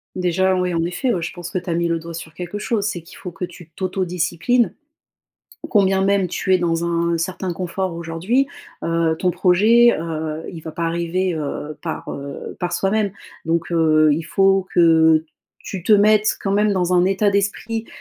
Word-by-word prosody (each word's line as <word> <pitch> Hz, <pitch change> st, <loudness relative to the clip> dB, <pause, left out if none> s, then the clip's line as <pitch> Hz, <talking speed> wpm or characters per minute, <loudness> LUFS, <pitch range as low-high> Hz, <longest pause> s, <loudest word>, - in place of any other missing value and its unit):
Déjà, 185 Hz, +1 st, +1 dB
ouais, 180 Hz, -1 st, 0 dB
en 165 Hz, -1 st, 0 dB
effet, 180 Hz, +9 st, -1 dB
je 165 Hz, -, -4 dB
pense 175 Hz, -1 st, -8 dB
que -, -, -2 dB
tu 180 Hz, 0 st, -5 dB
as -, -, +1 dB
mis 170 Hz, 0 st, 0 dB
le 165 Hz, -1 st, 0 dB
doigt 170 Hz, +1 st, -9 dB
sur 160 Hz, -1 st, -8 dB
quelque 180 Hz, +4 st, -6 dB
chose, 210 Hz, -1 st, -1 dB
c'est 185 Hz, -5 st, -2 dB
qu'il 165 Hz, -, -15 dB
faut 180 Hz, -, -7 dB
que 175 Hz, +2 st, -4 dB
tu 175 Hz, -1 st, -14 dB
t'autodisciplines. 180 Hz, +5 st, 0 dB, 1.0 s
Combien 195 Hz, -3 st, +3 dB
même 200 Hz, -1 st, +2 dB
tu 190 Hz, +2 st, 0 dB
es -, -, +4 dB
dans 170 Hz, -1 st, 0 dB
un 170 Hz, 0 st, 0 dB
certain 185 Hz, +1 st, -3 dB
confort 185 Hz, +1 st, -3 dB
aujourd'hui, 170 Hz, +11 st, 0 dB, 0.4 s
heu, 165 Hz, -1 st, +1 dB
ton 180 Hz, -, +1 dB
projet, 210 Hz, +7 st, +4 dB
heu, 160 Hz, -1 st, -4 dB
il 165 Hz, -, -8 dB
va 160 Hz, 0 st, -8 dB
pas 170 Hz, -, -3 dB
arriver, 170 Hz, +2 st, -1 dB
heu, 150 Hz, 0 st, -4 dB
par, 165 Hz, -, -5 dB
heu, 140 Hz, 0 st, -7 dB
par 175 Hz, 0 st, -2 dB
soi-même. 200 Hz, 0 st, 0 dB, 0.3 s
Donc 165 Hz, +1 st, 0 dB
heu, 155 Hz, -2 st, +4 dB
il 160 Hz, -, -1 dB
faut 195 Hz, +2 st, +2 dB
que 160 Hz, -2 st, +5 dB, 0.3 s
tu 190 Hz, -3 st, -7 dB
te 215 Hz, -, +3 dB
mettes 215 Hz, +1 st, +4 dB
quand 195 Hz, -, -1 dB
même 210 Hz, +1 st, +3 dB
dans 180 Hz, -2 st, 0 dB
un 180 Hz, 0 st, +4 dB
état 195 Hz, +1 st, +2 dB
d'esprit, 215 Hz, +3 st, -1 dB
175 Hz, 190 wpm, -20 LUFS, 165-195 Hz, 1.0 s, que